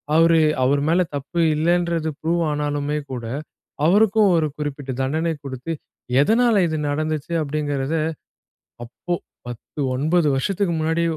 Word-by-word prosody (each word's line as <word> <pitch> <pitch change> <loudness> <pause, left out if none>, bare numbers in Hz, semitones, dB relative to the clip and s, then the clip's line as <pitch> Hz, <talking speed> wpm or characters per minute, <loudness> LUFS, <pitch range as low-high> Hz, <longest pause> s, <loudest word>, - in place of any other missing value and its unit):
அவரு 165 0 +5 0.2
அவரு 140 +2 +2
மேல 175 +3 +3
தப்பு 145 +5 -4 0.2
இல்லன்றது 170 0 +1
ப்ரூவ் 170 +2 +1
ஆனாலுமே 145 0 -1
கூட, 120 -2 -4 0.6
அவருக்கும் 205 +2 +4
ஒரு 160 - +2
குறிப்பிட்ட 145 -2 -5
தண்டனை 160 +5 0
கொடுத்து, 135 +4 -5 0.5
எதனால 230 +9 +4
இது 160 - -1
நடந்துச்சு, 155 +2 -2
அப்படிங்கறத. 145 -1 -2 0.9
அப்போ 150 +9 -4 0.3
10, 120 +4 -9 0.2
9 155 +4 +2
வருஷத்துக்கு 185 +5 0
முன்னாடி 165 +2 +1
155 Hz, 120 wpm, -22 LUFS, 145-170 Hz, 0.9 s, அவரு